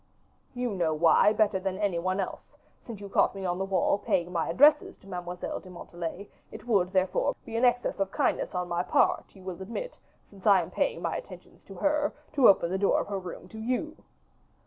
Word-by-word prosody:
"You 245 -1 -2
know 170 -5 0
why, 165 +6 +5
better 215 -3 +2
than 190 0 -3
any 200 -4 0
one 185 +3 -1
else, 190 - -6 0.2
since 225 -4 -9
you 200 - -8
caught 195 - +2
me 195 -1 -5
on 180 0 -1
the 195 - -1
wall 195 +1 +1
paying 175 -2 0
my 165 -2 -1
addresses 290 - +4
to 195 - -20
Mademoiselle 180 -1 -5
de 185 - -14
Montalais; 175 +2 -7 0.2
it - - -10
would, 195 -6 +2
therefore, 185 -1 +1
be 225 - -7
an 235 +2 +3
excess 245 -3 +1
of 195 -1 0
kindness - - 0
on 180 0 -1
my 175 0 -1
part, - - +1
you 190 - -14
will 185 0 -7
admit, 235 - -6 0.3
since 195 0 -8
I 195 -3 +6
am - - -10
paying - - -1
my - - -1
attentions - - -12
to - - -11
her, 300 0 +1 0.2
to 275 -5 +6
open 180 -3 +3
the 190 - -1
door 200 - +3
of - - -4
her 200 -1 -2
room 180 -1 -9
to 220 - -10
you." 255 +8 -2
195 Hz, 215 wpm, -28 LUFS, 180-220 Hz, 0.3 s, I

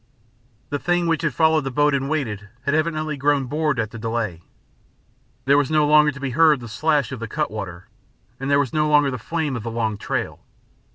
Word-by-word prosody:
The 145 - -1
thing 175 +2 +1
which 165 -2 +1
had 155 -2 0
followed 160 -2 +3
the 135 - -3
boat 145 +3 +2
and 135 0 -1
waited, 110 -10 -3
had 140 - 0
evidently 155 -1 -1
grown 140 0 +1
bored 150 0 -1
at 110 -1 -2
the 115 - -8
delay. 110 -6 -3 1.0
There 140 +2 +5
was 145 - 0
no 155 -1 +3
longer 150 0 +5
to 140 - -11
be 135 -2 -3
heard 155 +1 +4
the 120 - -9
slash 145 +6 0
of 130 - -5
the 115 - -5
cut - - -2
water, 90 -5 -7 0.5
and 135 +1 -3
there 140 - +4
was 140 -4 0
no 150 0 +1
longer 145 -2 +4
the 125 - -5
flame 155 +1 -2
of 120 - -4
the 115 - -5
long 110 -2 -2
trail. - - -3
140 Hz, 220 wpm, -22 LUFS, 115-155 Hz, 1.0 s, There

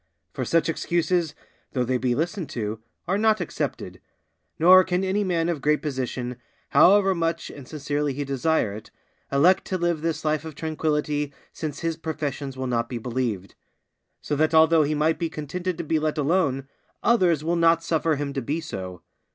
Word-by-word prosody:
For 130 - -3
such 165 +6 +2
excuses, 170 -1 0 0.4
though 125 - +1
they 125 +1 0
be 125 -1 +1
listened 170 - -2
to, 110 -5 -4 0.3
are 190 +3 +1
not 220 -1 +3
accepted; 175 - -4 0.6
nor 185 +3 +8
can 180 0 -1
any 195 +2 +1
man 170 -3 0
of 170 -5 -2
great 150 +1 +1
position, 125 -3 -3 0.3
however 195 0 +6
much 165 -1 -2
and 140 -3 -11
sincerely 145 -1 -2
he 140 +2 -3
desire 140 -4 0
it, 105 +1 -9 0.4
elect 170 +7 +4
to 185 - -2
live 170 -3 0
this 160 -1 -2
life 155 -1 +1
of 160 -2 -8
tranquillity 150 -2 -1 0.2
since 150 -2 -5
his 165 -1 -1
professions 145 -4 -4
will 130 - -3
not 120 -2 -1
be 125 - -4
believed; 115 -5 -3 0.7
so 145 - -2
that 155 +2 +2
although 160 0 +6
he 150 +1 +1
might 155 +2 +1
be 165 -2 -1
contented 175 +4 -4
to - - -3
be 160 0 +1
let 155 +1 -1
alone, 145 -3 +1 0.4
others 180 - +3
will 170 +2 0
not 165 0 +3
suffer 165 -1 +1
him 140 -1 -3
to 135 - -2
be 145 +7 -2
so. 95 - -7
155 Hz, 180 wpm, -25 LUFS, 140-170 Hz, 0.7 s, nor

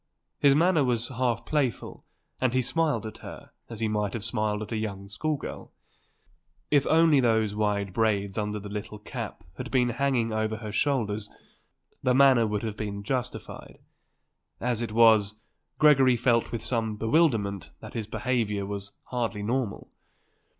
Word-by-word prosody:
His 140 -1 +5
manner 165 -1 +4
was 120 -2 0
half 125 -2 -1
playful 140 -6 -2 0.4
and 130 -2 +1
he 130 0 +2
smiled 160 -1 0
at 110 - -8
her - - -10 0.2
as 115 -2 -7
he 110 - +1
might 105 -2 -1
have 115 - -4
smiled 105 -1 0
at 110 - -10
a 115 - -1
young 100 -3 -4
school 150 +10 -2
girl. - - -8 1.0
If 145 -2 +4
only 160 -2 +5
those 110 -4 +2
wide 105 -2 -1
braids 100 -3 +1
under 105 0 -2
the 105 0 -7
little 105 +1 -6
cap 105 - -7
had 125 -1 -5
been 125 -2 +2
hanging 120 -2 0
over 110 0 -1
her 110 -1 -6
shoulders 110 -5 0 0.7
the 125 -1 +2
manner 130 -4 +6
would 105 0 -2
have 110 -2 -3
been 100 -1 -4
justified. 125 +3 -5 0.8
As 120 -1 -1
it 115 - -3
was, 110 -2 +5 0.4
Gregory 135 -5 +5
felt 115 0 +2
with 115 -2 -4
some 110 -3 -1
bewilderment 110 - +1
that - - -10
his 110 -3 -4
behaviour 110 -3 -1
was 100 0 -6
hardly 115 -4 -3
normal. 120 -1 -2
115 Hz, 160 wpm, -27 LUFS, 105-130 Hz, 1.0 s, manner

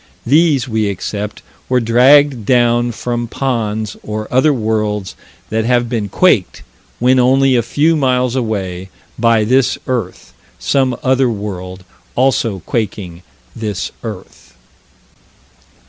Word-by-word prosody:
These 145 0 +3
we 110 -3 0
accept 105 +2 -5 0.3
were 125 -1 +3
dragged 125 +2 +4
down 120 +1 +2
from 120 +1 -3
ponds 110 -5 -2
or 110 0 -5
other 130 +4 +4
worlds 105 -5 -2 0.4
that 110 +1 0
have 120 -1 +1
been 110 -4 -2
quaked, 110 - +1 0.3
when 125 +2 +3
only 130 +1 +3
a 120 - +3
few 150 +8 +1
miles 125 -3 +1
away, 95 -7 -3 0.3
by 115 -1 +3
this 130 +4 +2
earth, 120 - -4 0.2
some 130 -3 0
other 130 -1 +2
world 95 -4 -6 0.3
also 120 -7 +1
quaking 100 -6 -3 0.3
this 105 -4 -4
earth. 105 -5 -10
115 Hz, 115 wpm, -16 LUFS, 105-130 Hz, 0.4 s, dragged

